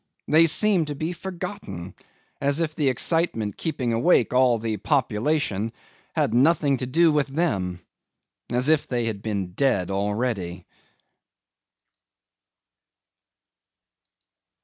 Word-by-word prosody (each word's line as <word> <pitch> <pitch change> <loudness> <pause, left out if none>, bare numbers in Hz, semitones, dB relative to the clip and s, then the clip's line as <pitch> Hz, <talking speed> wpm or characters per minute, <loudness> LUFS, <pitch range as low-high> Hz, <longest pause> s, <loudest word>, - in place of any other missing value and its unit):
They 165 +2 +6
seemed 180 0 +3
to 145 - -4
be 160 +5 -3
forgotten, 170 - -7 0.5
as 140 +2 +1
if 160 -2 -1
the 145 -4 +2
excitement 130 - 0
keeping 135 -8 -2
awake 120 +1 +3
all 125 -2 +4
the 110 -1 -3
population 115 -3 0 0.4
had - - +1
nothing 140 +2 +3
to 125 - -4
do 165 +5 +4
with 150 -2 +1
them, 100 - -1 0.7
as 125 +3 0
if 155 -1 +3
they 120 -2 -1
had 110 -3 -3
been 100 -4 -3
dead 100 -7 +1
already. 100 -3 -2
130 Hz, 110 wpm, -24 LUFS, 105-155 Hz, 0.7 s, They